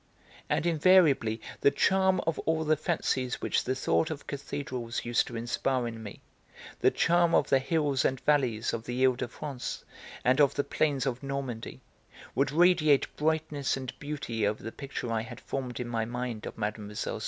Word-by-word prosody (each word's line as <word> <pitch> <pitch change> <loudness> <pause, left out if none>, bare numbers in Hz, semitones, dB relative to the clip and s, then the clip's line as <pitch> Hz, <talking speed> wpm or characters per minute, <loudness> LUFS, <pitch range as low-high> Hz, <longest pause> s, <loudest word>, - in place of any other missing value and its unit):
And - - +1
invariably 160 -9 +4 0.2
the - - +5
charm 190 +3 +2
of 165 -1 -1
all 160 0 0
the 155 0 +3
fancies 140 -5 -1
which - - 0
the 130 - 0
thought 160 +4 +1
of 155 -3 -6
cathedrals 130 -5 -4
used 120 0 +2
to 120 - -7
inspire 120 +2 -1
in 115 -1 -6
me, 105 -2 -9 0.6
the - - +5
charm 170 0 +3
of 140 - +3
the 135 - +5
hills 145 -1 +1
and 130 -1 +1
valleys 125 -7 +1
of 115 -1 -4
the 125 0 -4
He 130 -1 +4
de 125 - -3
France 135 +1 -6 0.4
and 130 +3 +4
of 140 -1 +4
the 140 - +1
plains 140 -4 0
of 125 -2 -2
Normandy, 135 -4 -5 0.5
would 140 +1 +1
radiate 160 -3 +4
brightness 155 -3 0
and 130 -1 -5
beauty 135 -8 -2
over 105 +1 -3
the 115 - -5
picture 135 -3 -5
I 110 -1 0
had 120 +1 -9
formed 130 -3 -4
in 125 - -3
my 115 -2 -1
mind 120 -2 -4
of - - -8
Mlle. 105 0 -3
135 Hz, 180 wpm, -29 LUFS, 120-150 Hz, 0.6 s, the